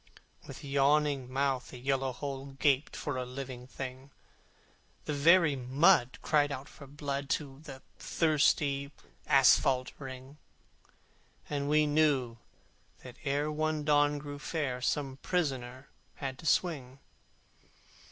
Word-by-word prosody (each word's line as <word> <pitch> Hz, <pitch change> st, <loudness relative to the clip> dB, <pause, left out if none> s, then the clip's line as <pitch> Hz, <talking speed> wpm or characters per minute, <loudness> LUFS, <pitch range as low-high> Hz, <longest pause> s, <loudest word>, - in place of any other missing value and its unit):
With -, -, -10 dB
yawning 140 Hz, -1 st, +1 dB
mouth 135 Hz, -1 st, 0 dB
the 125 Hz, -, -10 dB
horrid 135 Hz, -1 st, +1 dB
hole 135 Hz, 0 st, -5 dB
Gaped 140 Hz, 0 st, +1 dB
for 145 Hz, -4 st, -3 dB
a 130 Hz, -, -2 dB
living 125 Hz, -1 st, -7 dB
thing; 130 Hz, +1 st, -7 dB, 1.0 s
The 150 Hz, -, -2 dB
very 160 Hz, +1 st, +5 dB
mud 130 Hz, +2 st, +3 dB
cried 145 Hz, -2 st, +2 dB
out 140 Hz, +1 st, -6 dB
for 140 Hz, -, -13 dB
blood 140 Hz, 0 st, -4 dB
To 135 Hz, -3 st, -11 dB
the 140 Hz, -4 st, -11 dB, 0.2 s
thirsty 145 Hz, -3 st, +1 dB, 0.4 s
asphalte 130 Hz, -1 st, +4 dB
ring: 135 Hz, +1 st, -9 dB, 1.1 s
And 145 Hz, -1 st, -2 dB
we 150 Hz, 0 st, +4 dB
knew 145 Hz, -6 st, +2 dB, 0.7 s
that 125 Hz, -1 st, -11 dB
ere 145 Hz, +1 st, 0 dB
one 155 Hz, 0 st, -1 dB
dawn 145 Hz, 0 st, +3 dB
grew 145 Hz, 0 st, -7 dB
fair 145 Hz, -5 st, -3 dB
The 135 Hz, 0 st, -1 dB
fellow 130 Hz, -7 st, -1 dB, 0.3 s
had 135 Hz, -2 st, -5 dB
to 160 Hz, -, -6 dB
swing. 140 Hz, -9 st, 0 dB
140 Hz, 125 wpm, -31 LUFS, 130-150 Hz, 1.1 s, very